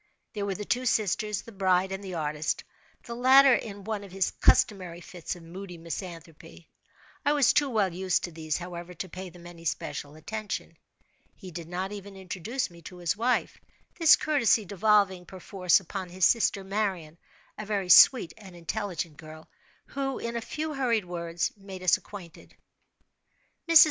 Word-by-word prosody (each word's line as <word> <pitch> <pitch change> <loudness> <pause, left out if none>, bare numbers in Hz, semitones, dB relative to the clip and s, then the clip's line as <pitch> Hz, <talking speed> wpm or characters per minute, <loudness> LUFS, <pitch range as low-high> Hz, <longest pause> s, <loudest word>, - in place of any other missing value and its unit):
There 205 -2 -3
were 195 - -2
the 210 - -5
two 250 +4 0
sisters, 210 -1 0
the 230 - -12
bride, 190 -2 +2
and 195 +1 -5
the 185 -2 -6
artist—the 155 +8 -4
latter 260 +2 +7
in 205 -4 -3
one 215 0 -3
of 195 - -11
his 190 0 0
customary 180 -5 +2
fits 175 0 -6
of 175 - -13
moody 180 +1 -9
misanthropy. 165 -1 -9 0.5
I 290 - +3
was 285 -4 +4
too 290 -2 +3
well 205 -7 +1
used 185 0 0
to 175 - -4
these, 155 -2 -3
however, 175 0 -7
to 185 - -5
pay 185 +2 -7
them 175 0 -15
any 170 -1 -11
special 150 -2 -4
attention. 215 +6 -5 0.6
He 185 -4 -11
did 165 -1 -7
not 185 +3 -3
even 200 -1 -8
introduce 190 +6 -4
me 170 0 -14
to 180 +3 -10
his 175 0 -1
wife—this 250 - +2
courtesy 235 -8 +2
devolving, 200 -1 +2
per 190 - -10
force, 180 -1 +2
upon 190 0 -6
his 180 0 +2
sister 210 -4 +3
Marian—a 190 -2 -5
very 200 -3 -2
sweet 180 -2 +8
and 190 -4 -12
intelligent 175 -3 -4
girl, 155 0 -12 0.4
who, 270 -1 -3
in 235 0 -4
a 235 - -1
few 310 +6 -4
hurried 240 -7 +1
words, 170 -1 -2
made 195 -2 -10
us 180 - +5
acquainted. 180 -5 -11 1.1
Mrs. 330 -1 +9
190 Hz, 165 wpm, -28 LUFS, 175-215 Hz, 1.1 s, Mrs